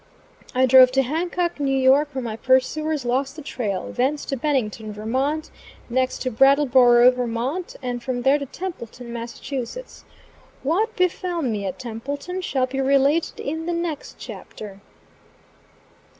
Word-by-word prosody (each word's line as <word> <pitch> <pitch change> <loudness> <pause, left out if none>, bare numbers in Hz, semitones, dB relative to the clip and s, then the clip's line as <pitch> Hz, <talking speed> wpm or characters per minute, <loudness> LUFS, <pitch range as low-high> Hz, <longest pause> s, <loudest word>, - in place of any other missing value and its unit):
I 260 +1 +4
drove 255 0 +8
to 270 0 +3
Hancock, 345 +4 -2
N.Y., 270 -2 +1
where 285 +3 +5 0.2
my 225 -2 -4
pursuers 260 +4 +1
lost 265 +3 -1
the 310 - -9
trail; 210 -9 -3
thence 275 +4 0
to 275 - -2
Bennington, 235 -6 -1
Vt., 265 +9 -2 0.4
next 255 +1 0
to 255 - -1
Brattleboro, 250 -1 +6
Vt., 250 +8 -3
and 245 -1 -3
from 245 0 -3
there 275 +3 +4
to 280 - -5
Templeton, 250 -9 -7
Mass. 235 0 -6 1.2
What 410 - 0
befel 360 -2 0
me 210 -6 -1
at 185 - -5
Templeton, 280 +10 -5
shall 265 -7 0
be 270 +1 -3
related 275 +4 +2
in 320 +3 -4
the 345 - 0
next 335 -3 -4
chapter. 200 -2 -9
265 Hz, 135 wpm, -23 LUFS, 245-305 Hz, 1.2 s, drove